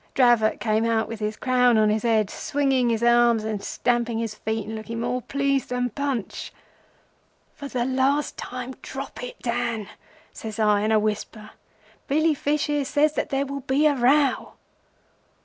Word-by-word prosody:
Dravot 240 -4 +4
came 220 0 +1
out 230 -1 +1
with 230 -1 -7
his 210 0 -3
crown 250 -2 +3
on 215 -1 +4
his 215 0 0
head, 220 -3 +1
swinging 270 -4 0
his 230 0 0
arms 235 -2 +4
and 215 -2 -3
stamping 240 0 0
his 225 -2 -3
feet, 220 0 -3
and 220 +1 -6
looking 225 +1 -6
more 245 +1 -1
pleased 275 +1 -1
than 250 -1 -1
Punch. 270 -5 -3 1.0
"'For 285 - -8
the 245 -3 -2
last 265 +3 +1
time, 250 +1 -6
drop 270 -1 -7
it, 245 - -7
Dan,' 235 -3 -2 0.4
says 220 -2 -7
I 210 -2 +3
in 215 +1 0
a 220 - +5
whisper. 215 0 -3 0.6
'Billy 310 +3 +2
Fish 295 +1 0
here 295 -1 0
says 295 +2 +2
that - - -2
there 275 0 0
will 280 0 -5
be 275 +3 +1
a 300 - +5
row. 275 +2 +2
240 Hz, 170 wpm, -24 LUFS, 220-275 Hz, 1.0 s, a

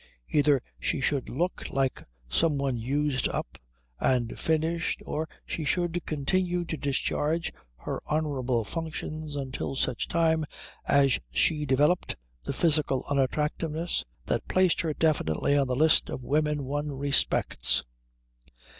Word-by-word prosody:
Either 145 -2 +4 0.2
she - - 0
should 135 0 0
look 175 +8 -2
like 135 -1 0 0.3
some 145 - +2
one 135 -2 0
used 135 +3 0
up - - -5 0.4
and 125 -3 +1
finished 160 +1 0
or 155 +1 -3 0.2
she 160 - -3
should 175 +2 0
continue 175 +4 0
to 165 - -3
discharge 150 +3 -1 0.2
her - - -5
honourable 135 -6 0
functions 155 +2 -5
until 135 -1 -4
such 130 -2 0
time 160 -1 +2 0.4
as 140 -3 +4
she 150 - +2
developed 145 +7 +2 0.3
the - - -4
physical 150 -5 +2
unattractiveness 150 +4 0 0.2
that - - -1
placed 185 -2 +3
her 160 - -1
definitely 145 - +1
on 140 -2 +3
the 125 - 0
list 155 +4 +4
of 130 - -5
women 150 +2 +1
one 145 +2 -2
respects. 140 - +3
150 Hz, 130 wpm, -28 LUFS, 135-160 Hz, 0.4 s, Either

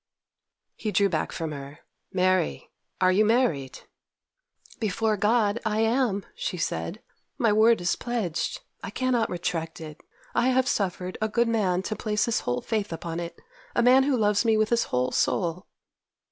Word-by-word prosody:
He 215 - -3
drew 200 +1 +3
back 160 -4 -1
from 160 -2 -4
her. 140 +1 -8 0.3
'Mary, 185 - +1 0.3
are 185 0 +4
you 200 +4 +4
married?' 215 - +1 1.0
'Before 215 0 0
God 210 +1 +2
I 220 -1 0
am!' 225 -3 +1
she - - -4
said. - - -3 0.3
'My 230 -6 +3
word 220 +2 +5
is 175 - +1
pledged. 220 -9 -2 0.2
I - - -4
cannot 255 -3 0
retract 165 -2 -3
it. 155 -2 -9 0.3
I 245 - +2
have 260 0 +3
suffered 185 -2 -2
a 215 - +2
good 235 +2 +2
man 190 -5 +1
to 215 - -3
place 210 0 0
his 235 - +1
whole 125 0 -2
faith 215 -4 -2
upon 165 0 -4
it—a 465 - -5
man 255 +2 +7
who 270 -1 +2
loves 210 -1 +2
me 225 -2 +3
with 215 0 +2
his 235 -1 +2
whole 125 0 0
soul! 175 +1 0
210 Hz, 160 wpm, -26 LUFS, 175-235 Hz, 1.0 s, man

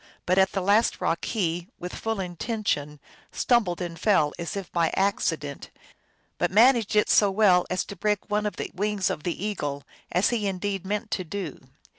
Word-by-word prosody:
But 185 +2 +3
at 190 0 +3
the 195 - 0
last 205 +4 +3
rock 165 0 -1
he, 175 -5 -1
with 180 +1 -7
full 225 -2 -3
intention, 175 -5 -2 0.3
stumbled 210 -8 +1
and 170 -2 -5
fell 180 -7 +3
as 170 +3 -4
if 195 -3 -6
by 170 -2 +1
accident, 165 -7 -1 0.7
yet - - +2
managed 225 +1 +4
it 210 - +4
so 205 - +5
well 190 -3 +4
as 185 0 -1
to 200 - -8
break 210 0 -1
one 210 0 0
of 210 - -4
the - - -5
wings 205 0 0
of - - -4
the 175 +4 -3
eagle, 145 -9 -3 0.3
as 180 +3 +3
he 220 -4 0
indeed 195 0 -3
meant 210 +1 -3
to 185 - -1
do. 180 -2 -5
190 Hz, 185 wpm, -26 LUFS, 175-210 Hz, 0.7 s, so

